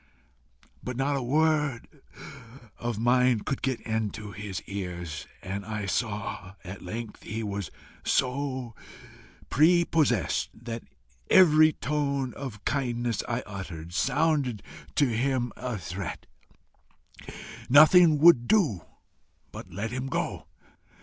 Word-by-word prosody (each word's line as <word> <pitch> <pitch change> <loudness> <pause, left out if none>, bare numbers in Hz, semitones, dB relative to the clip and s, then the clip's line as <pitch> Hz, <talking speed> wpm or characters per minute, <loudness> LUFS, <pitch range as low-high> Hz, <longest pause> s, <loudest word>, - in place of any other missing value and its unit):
But 125 -1 -5
not 140 +2 +1
a 135 - -1
word 150 -1 +1 0.9
of 120 -3 -3
mine 125 0 +3
could 135 - -3
get 130 -3 -1
into 110 -2 -3
his 100 0 -6
ears, 90 -6 -6 0.2
and 100 +1 -4
I 105 0 -4
saw 100 -2 -3
at 95 +1 -8
length 110 +4 -6
that - - -13
he 110 0 -3
was 100 -4 -4 0.3
so 130 -2 -1 0.8
PRE 170 +4 +5
possessed, 130 - +1
that 115 0 -6 0.5
every 155 -4 +7
tone 140 -4 -1
of 110 -7 -8
kindness 120 -4 -1
I 120 +1 -1
uttered, 90 -5 -7
sounded 145 - +1 0.3
to 145 - +4
him 125 0 0
a 125 -3 -4
threat: 90 0 -6 1.4
nothing 155 +3 +7
would 145 -6 +6
do 150 - +2 0.7
but 90 - -10
let 100 +5 -4
him 130 +1 -3
go. - - -3
120 Hz, 115 wpm, -27 LUFS, 100-140 Hz, 1.4 s, every